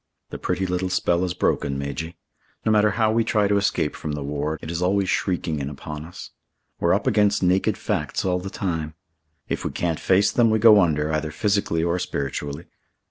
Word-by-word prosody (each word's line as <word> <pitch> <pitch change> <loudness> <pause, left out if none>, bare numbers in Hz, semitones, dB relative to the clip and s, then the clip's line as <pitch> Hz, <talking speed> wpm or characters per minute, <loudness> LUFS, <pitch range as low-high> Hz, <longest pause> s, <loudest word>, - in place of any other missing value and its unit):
"The - - -6
pretty 95 - -1
little 90 0 -1
spell 90 -1 +1
is 90 -1 -2
broken, 70 -1 0
Majy. 75 +5 -5 0.5
No 110 - +3
matter 105 0 +4
how 110 -2 +3
we 115 +1 +2
try 105 -2 +2
to 100 0 +2
escape 100 -6 0
from 75 - -5
the 75 -1 -4
war, 75 +2 -2
it 80 - -7
is 85 0 -3
always 95 +1 +1
shrieking 85 -5 -1
in 70 0 -3
upon 75 +1 -7
us. 85 - -10 0.5
We're 85 +2 +3
up 100 - -2
against 105 -5 +2
naked 90 +1 +2
facts - - -2
all 90 -1 +1
the 95 +2 -6
time. 80 -6 -3 0.5
If - - -3
we - - -1
can't 85 -3 -2
face 95 +1 +3
them 120 -2 +3
we 110 - +3
go 105 -2 +7
under 75 -3 +1
either 75 0 -1
physically 100 -1 0
or 85 +1 0
spiritually. 70 +1 -4
90 Hz, 200 wpm, -23 LUFS, 75-100 Hz, 0.5 s, go